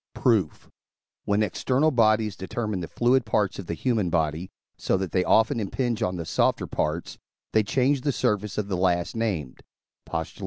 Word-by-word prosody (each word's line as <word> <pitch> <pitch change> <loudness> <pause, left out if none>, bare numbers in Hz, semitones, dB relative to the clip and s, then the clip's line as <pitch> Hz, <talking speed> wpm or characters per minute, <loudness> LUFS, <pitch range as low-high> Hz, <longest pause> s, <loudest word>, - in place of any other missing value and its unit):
Proof. 110 - +1 0.6
When 105 +1 +2
external 130 - +1
bodies 110 -4 +2
determine 105 +1 -3
the 85 - -5
fluid 125 +2 +2
parts 105 -3 0
of 95 - -7
the 85 - -3
human 110 -4 0
body, 80 +1 -1 0.3
so - - 0
that 95 -3 -3
they 90 - +2
often 110 +3 +3
impinge 115 +3 -2
on 95 -4 0
the 85 -2 -5
softer - - +1
parts, 80 +3 -3 0.3
they 110 - +5
change 130 +7 +1
the 145 - 0
surface 105 -5 -1
of 105 -2 -1
the 95 -3 -2
last 90 0 0
named 95 - -2 0.5
(Post. 80 -1 -4
105 Hz, 170 wpm, -25 LUFS, 90-115 Hz, 0.6 s, they